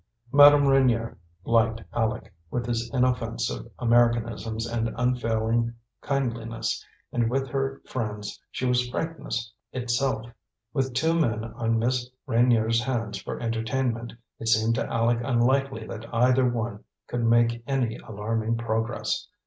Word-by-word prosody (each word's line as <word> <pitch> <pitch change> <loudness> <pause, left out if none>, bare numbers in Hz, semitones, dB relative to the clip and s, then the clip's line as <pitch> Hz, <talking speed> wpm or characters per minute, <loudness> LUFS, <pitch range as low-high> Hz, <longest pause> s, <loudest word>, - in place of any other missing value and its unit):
Madame 145 0 +8
Reynier 125 -4 +3 0.3
liked 115 0 +2
Aleck, 110 -4 -1 0.2
with 120 +4 -2
his 115 -1 -2
inoffensive 115 - 0
Americanisms 115 -2 +2
and 115 -1 -1
unfailing 115 -1 +1 0.3
kindliness; 115 -5 -2 0.3
and 120 -2 +1
with 135 +2 0
her 135 +1 -2
friends 105 -4 -4
she 130 - -3
was 125 -1 +2
frankness 125 -6 -3 0.2
itself. 125 -1 -1 0.5
With 135 -4 -1
two 160 +6 +2
men 115 -10 +1
on 115 0 -1
Miss 125 +2 0 0.2
Reynier's 115 -2 +3
hands 115 -6 -2
for - - -5
entertainment, 115 +1 -1 0.3
it 115 - -5
seemed 110 0 +3
to 130 - -1
Aleck 115 0 +2
unlikely 130 -1 +1
that 115 +1 -8
either 125 +2 +4
one 115 -2 -3 0.2
could 120 -1 -3
make 115 0 +3
any 130 -5 0
alarming 110 +2 -2
progress. 115 0 -2
115 Hz, 125 wpm, -26 LUFS, 115-125 Hz, 0.5 s, Madame